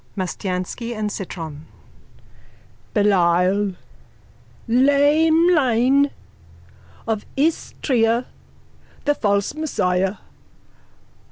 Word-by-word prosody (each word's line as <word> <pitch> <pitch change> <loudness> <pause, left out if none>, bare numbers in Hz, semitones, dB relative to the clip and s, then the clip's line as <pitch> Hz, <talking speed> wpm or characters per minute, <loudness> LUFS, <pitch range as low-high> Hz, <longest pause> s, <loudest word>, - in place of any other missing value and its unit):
_ - - -40
MASTIANSKY 185 +4 -4
AND 210 -1 -3
CITRON: 160 -6 -7 1.3
Belial! 190 -1 +2 0.9
Laemlein 285 0 +3 1.0
of 220 -2 -1
Istria, 250 -5 0 0.8
the 290 - +3
false 200 -4 0
Messiah! 195 -11 -1
225 Hz, 60 wpm, -21 LUFS, 190-280 Hz, 1.3 s, Laemlein